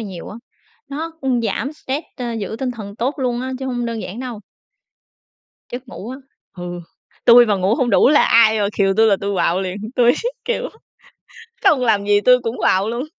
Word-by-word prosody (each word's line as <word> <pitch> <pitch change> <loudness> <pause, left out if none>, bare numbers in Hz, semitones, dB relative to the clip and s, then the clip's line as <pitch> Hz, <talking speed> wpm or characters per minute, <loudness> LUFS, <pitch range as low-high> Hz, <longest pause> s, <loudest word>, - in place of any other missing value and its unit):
nhiều 190 -6 -7
á. 210 - -9 0.5
Nó 315 +4 -4
cũng 255 -3 0
giảm 230 +4 -2
stress, 295 0 -5
ơ, 240 -2 -4
giữ 220 0 -4
tinh 260 -1 -2
thần 210 -3 -8
tốt 260 +5 -1
luôn 245 -2 -1
á, 260 +1 -4
chứ 265 - -5
hông 245 -2 -2
đơn 230 -1 -4
giản 220 +7 -7
đâu. 245 -5 -6 1.3
Giấc 245 +1 -7
ngủ 230 -1 -8
á. 260 - -6 0.4
Hừ. 175 0 -6 0.4
Tui 240 0 +8
mà 210 - +2
ngủ 190 +4 +1
hông 245 -2 0
đủ 200 - +5
là 295 +1 +5
ai 220 -1 +5
mà 200 - +1
khều 195 -1 +3
tui 225 0 +5
là 200 - +4
tui 200 0 -2
quạu 175 +1 +1
liền, 185 0 -4 0.2
tui, 245 0 +5 0.3
kiểu, - - -2 0.9
không 315 -9 +4
làm 220 -5 +2
gì 205 0 +4
tui 250 +2 +5
cũng 230 +2 -3
quạu 195 +3 +2
luôn. 240 +4 -3
235 Hz, 205 wpm, -19 LUFS, 205-255 Hz, 1.3 s, Tui